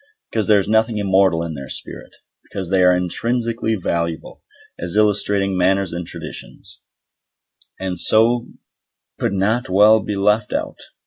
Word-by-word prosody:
Because 110 -2 -1
there 105 -2 +5
is 95 - -2
nothing 110 +1 +1
immoral 95 -4 +2
in 85 -1 -5
their 70 -2 -8
spirit. - - -7 0.3
Because 95 -2 -7
they 95 -1 +3
are 90 0 +5
intrinsically 115 +5 -1
valuable, 85 -3 -3 0.4
as 90 +2 -5
illustrating 100 -2 +2
manners 95 0 +1
and 85 -1 -5
traditions, - - -9 1.0
and 95 -2 -4
so 115 +4 +3 0.7
could - - -1
not 105 +5 0
well 105 +4 +5
be 105 -1 -4
left 105 +2 +1
out. - - -4
100 Hz, 140 wpm, -19 LUFS, 90-110 Hz, 1.0 s, there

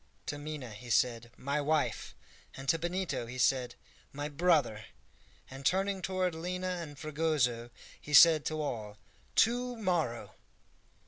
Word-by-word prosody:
to 145 - -4
Minha 145 -5 -6
he 115 +4 -10
said, 120 0 +1
"My 140 +2 -1
wife!" 145 -7 -1 0.4
and 135 +1 -8
to 165 - +3
Benito 175 -7 -2
he 125 +2 -7
said, 125 -1 +1 0.4
"My 145 +1 -4
brother!" 145 -9 +2 0.6
and, 135 +1 -10
turning 190 +5 +1
toward 185 -1 -1
Lina 180 +2 -3
and 145 -4 -8
Fragoso, 150 -7 0 0.3
he 150 - -9
said 160 0 +8
to 155 0 -2
all, 110 -8 -4 0.4
"To 245 +2 +2
morrow!" 175 - -1
150 Hz, 135 wpm, -31 LUFS, 125-175 Hz, 0.6 s, said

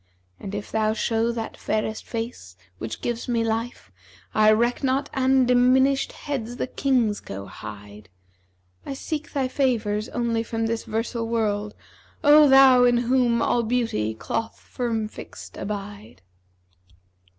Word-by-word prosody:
And 200 +1 -6
if 205 - -6
thou 215 -1 +1
show 225 +1 0
that 230 -1 -5
fairest 215 0 -2
face 225 - -6 0.2
which 110 0 -6
gives 240 -1 -3
me 235 -2 +1
life, 225 +2 -3 0.2
* - - -27
I 215 0 +5
reck 235 +5 +1
not 270 +1 0
an 265 -1 +3
dimimshed 260 +2 +3
heads 245 -5 -3
the - - -2
Kings 250 -6 0
go 100 0 -8
hide. 105 +1 -10 0.7
I 275 - -5
seek 310 +3 -5
thy 270 -3 0
favours 230 -5 0
only 235 -1 -1
from 225 0 -3
this 225 0 -2
'versal 230 +1 -2
world: 210 -2 -1 0.3
* - - -31
O 295 0 +7
thou 265 -2 +7
in 245 -1 +4
whom 240 -1 +2
all 240 - +2
beauty 225 - -1
cloth 225 - -4
firm 230 -4 -3
fixt - - -11
abide!' 205 - -7
230 Hz, 145 wpm, -24 LUFS, 215-250 Hz, 0.7 s, O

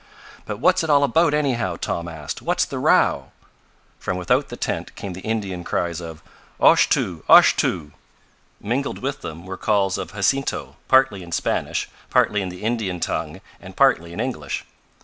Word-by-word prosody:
"But 105 - -4
what's 185 +6 +3
it 160 - -3
all 145 -1 +5
about, 160 +3 +3
anyhow?" 120 - 0
Tom 85 0 -3
asked. 75 -5 -6
"What's - - +1
the - - -5
row?" - - +3 0.7
From 90 - -3
without 90 - +1
the - - -7
tent - - -4
came 100 -2 -6
the 90 - -8
Indian 100 -5 -3
cries 85 0 -2
of: 80 -1 -9 0.4
"Oshtoo! 85 -4 +3
Oshtoo!" 75 -4 +5 0.7
Mingled 125 +7 -2
with 135 +2 -4
them 80 +2 -8
were 95 0 -6
calls 100 -3 +1
of - - -6
Jacinto, 135 +7 -1
partly 130 -7 +4
in 85 -1 -11
Spanish, - - -1 0.2
partly 105 -1 +2
in 95 - -3
the 90 +3 -10
Indian 110 -6 -1
tongue - - -3 0.2
and - - -11
partly 85 0 +3
in 85 - -8
English. - - -3
95 Hz, 165 wpm, -22 LUFS, 85-120 Hz, 0.7 s, all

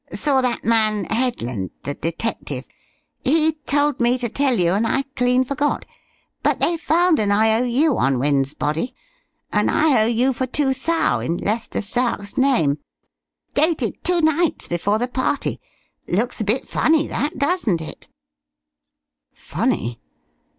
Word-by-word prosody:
Saw 275 -3 +2
that 250 -1 -2
man 215 -2 +2
Headland, 125 - -2
the 145 - -3
detective. 165 +10 -4 0.6
He 310 +2 +2
told 290 0 +1
me 240 +1 +2
to 245 -2 -3
tell 270 0 +1
you, 175 -1 +2
and 215 +4 +1
I 270 +4 +1
clean 250 0 +2
forgot. 285 +3 -1 0.6
But - - +1
they 340 - +2
found 340 +1 +2
an 210 -2 +1
I.O.U. 235 +7 +2
on 135 -1 +2
Wynne's 140 +1 +1
body, 165 - -2 0.6
an - - +2
I.O.U. 250 -3 +3
for 255 +1 -2
two 265 +1 +1
thou' 325 +6 0
in 170 +1 -2
Lester 220 +1 -2
Stark's 210 -2 -1
name. 245 - +2 0.7
Dated 315 +3 0
two 355 -1 +2
nights 315 +1 +1
before 195 +5 0
the 245 +2 -1
party. 260 +2 -2 0.5
Looks 225 +6 -1
a - - -1
bit 220 +6 0
funny, 315 -1 +2
that, 290 - -3
doesn't 280 - +1
it?" 160 - -8 1.3
Funny? 115 +1 -2
245 Hz, 135 wpm, -21 LUFS, 205-285 Hz, 1.3 s, I.O.U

